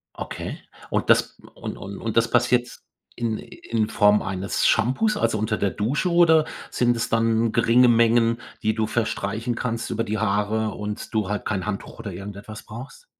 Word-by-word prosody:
Okay. - - -6 0.3
Und - - 0
das - - +3 0.2
und - - -6
und 100 0 -8
und 115 -1 -4
das 115 0 +3
passiert 120 0 +2 0.4
in 115 -2 -2
in 110 -2 -3
Form 105 0 +4
eines 95 +1 -1
Shampoos, 210 - +2
also 110 - +1
unter 110 +1 0
der 100 - +1
Dusche 130 - -1
oder 165 -2 +5 0.3
sind 120 -1 +2
es 115 - -1
dann 115 0 +2
geringe 120 +2 +5
Mengen, 115 0 +4 0.2
die 110 - +1
du 110 0 0
verstreichen 110 0 -2
kannst 115 -1 -3
über 115 - -1
die 110 0 -2
Haare 110 +1 0
und 105 0 -6
du 105 -3 +1
halt 105 0 -2
kein 95 -3 -2
Handtuch 100 -2 -5
oder 110 -4 -6
irgendetwas 100 +3 -8
brauchst? 120 - -10
115 Hz, 175 wpm, -24 LUFS, 105-120 Hz, 0.4 s, oder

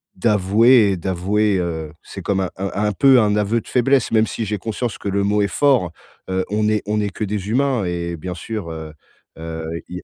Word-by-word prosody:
d'avouer, 105 +2 +4
et 95 - -1
d'avouer, 95 +4 0
heu, 80 -3 -3
c'est - - -9
comme 95 -1 0
un 95 - -1
un 95 +1 -2
un 105 +1 +1
peu 130 +5 +5
un 105 -2 +2
aveu 105 +2 +1
de - - -14
faiblesse, 130 +1 +2
même 110 -1 +3
si 115 - -4
j'ai 105 0 -3
conscience 110 +3 -4
que 100 - -4
le 100 +1 0
mot 105 +1 +2
est 100 - +2
fort. 125 - +2 0.4
Heu, 95 0 -1
on 105 0 +1
est 105 -1 0
on 105 +1 0
est 105 - -1
que 105 - -5
des 105 -1 -3
humains, 130 -2 +1
et 85 -1 -3
bien 90 +3 -6
sûr, 105 -1 -5
heu 80 -1 -7 0.5
heu, 80 0 -6 0.2
il 90 - -7
y - - -5
a - - -32
105 Hz, 235 wpm, -20 LUFS, 90-110 Hz, 0.5 s, peu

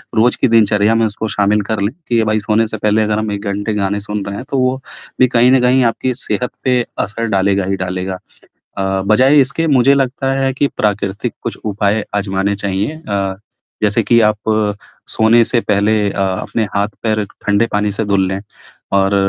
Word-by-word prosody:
रोज़ 120 +3 +3
के - - +4
दिनचर्या 110 -1 +3
में 115 0 +2
उसको 110 +1 -3
शामिल 105 +1 +2
कर 105 -2 -1
लें 100 +3 -1 0.2
कि 115 -2 +2
भाई 110 0 +1
सोने 110 +1 +2
से 110 - -5
पहले 105 +1 +1
अगर 105 0 -1
1 100 +1 -5
घंटे 105 +2 -3
गाने 100 0 -1
सुन 105 0 -4
रहे 100 0 -5
हैं 125 - -7
तो 135 - -1
वो 130 +1 +1 0.4
भी 130 - +6
कहीं 125 +2 +5
न 130 -1 +4
कहीं 125 +1 +3
आपकी 125 +2 -2
सेहत 125 - -2
पे 125 -1 +2 0.2
असर 115 +3 -2
डालेगा 95 0 +1
ही 95 0 -1
डालेगा। 90 +1 -4 0.6
अ, - - 0 0.2
बजाए 130 +7 +4
इसके 135 +5 +1
मुझे 135 +3 +5
लगता 135 0 0
है 135 0 +1
कि 140 - +1
प्राकृतिक 100 -2 -1
कुछ - - -4
उपाय 105 0 0
आज़माने 100 0 0
चाहिए 100 +11 -3
अ, 100 -1 -1 0.5
जैसे 105 +2 +2
कि 115 +2 +3
आप 105 -1 +3 0.7
सोने 115 +1 +4
से 120 0 +1
पहले 105 +1 +1 0.2
अ, 100 - -4
अपने 95 +4 -1
हाथ-पैर 105 +1 -1 0.2
ठंडे 105 +3 +3
पानी 105 0 +1
से 110 +2 -2
धुल 100 -2 +1
लें 95 +1 -3 0.6
और 95 +1 +2
105 Hz, 190 wpm, -16 LUFS, 100-115 Hz, 0.7 s, भी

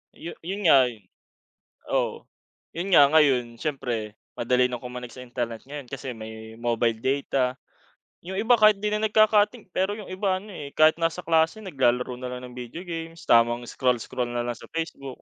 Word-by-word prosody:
Yu 170 - -7
yun 195 +4 -4
nga'y 125 - +4 0.9
Oo. - - -1 0.5
Yun 180 +3 -2
nga 140 -3 +8
ngayon, 130 -7 +3
siyempre 120 -8 -3 0.2
madali 125 +1 +2
na 125 -1 -5
kumonek 125 -1 -7
sa 130 - -10
internet 120 -2 -4
ngayon 145 0 -7
kasi 135 0 -6
may 110 0 -9
mobile 115 -1 0
data. 130 -1 0 0.7
Yung 190 +2 -5
iba 240 +2 +4
kahit 215 -1 +6
di 210 - 0
na 210 0 -1
nagka-cutting, 215 0 +3
pero 190 +2 0
yung 210 - -9
iba 185 0 0
ano 210 - -13
eh, 145 -5 -7
kahit 155 +1 +5
nasa 165 +1 -1
klase 165 +5 +2
naglalaro 125 - 0
na 125 0 -5
lang 125 - -6
ng 125 - -13
video 125 +7 -7
games. 165 -1 -6
Tamang 120 +1 +4
scroll-scroll 125 0 -1
na 120 - -1
lang 120 -2 -3
sa - - -12
Facebook. 140 -5 -5
135 Hz, 175 wpm, -25 LUFS, 120-175 Hz, 0.9 s, nga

